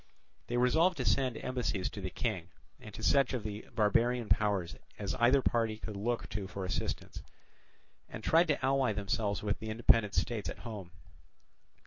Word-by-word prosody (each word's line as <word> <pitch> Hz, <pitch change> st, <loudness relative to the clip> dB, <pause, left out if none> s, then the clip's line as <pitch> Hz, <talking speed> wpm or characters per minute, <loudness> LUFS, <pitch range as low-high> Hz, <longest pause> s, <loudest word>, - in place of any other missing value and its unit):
They 120 Hz, -, -1 dB
resolved 160 Hz, +9 st, +3 dB
to 130 Hz, -, -2 dB
send 125 Hz, +3 st, +2 dB
embassies 120 Hz, -7 st, -2 dB
to 100 Hz, -, -7 dB
the 95 Hz, -, -3 dB
King 95 Hz, -4 st, -3 dB, 0.3 s
and -, -, -10 dB
to -, -, -8 dB
such 140 Hz, -2 st, +3 dB
other -, -, +1 dB
of 115 Hz, -, -8 dB
the 105 Hz, 0 st, -6 dB
barbarian 115 Hz, +2 st, +2 dB
powers 100 Hz, -5 st, +1 dB, 0.2 s
as 100 Hz, -2 st, -3 dB
either 125 Hz, +3 st, +5 dB
party 115 Hz, -2 st, +1 dB
could 110 Hz, -1 st, -7 dB
look 115 Hz, +4 st, -2 dB
to 100 Hz, -2 st, -4 dB
for 95 Hz, 0 st, -5 dB
assistance, 90 Hz, -, -3 dB, 0.9 s
and -, -, -8 dB
tried 165 Hz, +2 st, +4 dB
to 145 Hz, -3 st, 0 dB
ally 135 Hz, -4 st, +2 dB
themselves 100 Hz, 0 st, -1 dB
with 100 Hz, -1 st, -1 dB
the 110 Hz, -, -6 dB
independent 110 Hz, -1 st, +3 dB
states 115 Hz, -4 st, -1 dB
at -, -, -6 dB
home. 105 Hz, -6 st, -6 dB
110 Hz, 175 wpm, -32 LUFS, 100-125 Hz, 0.9 s, either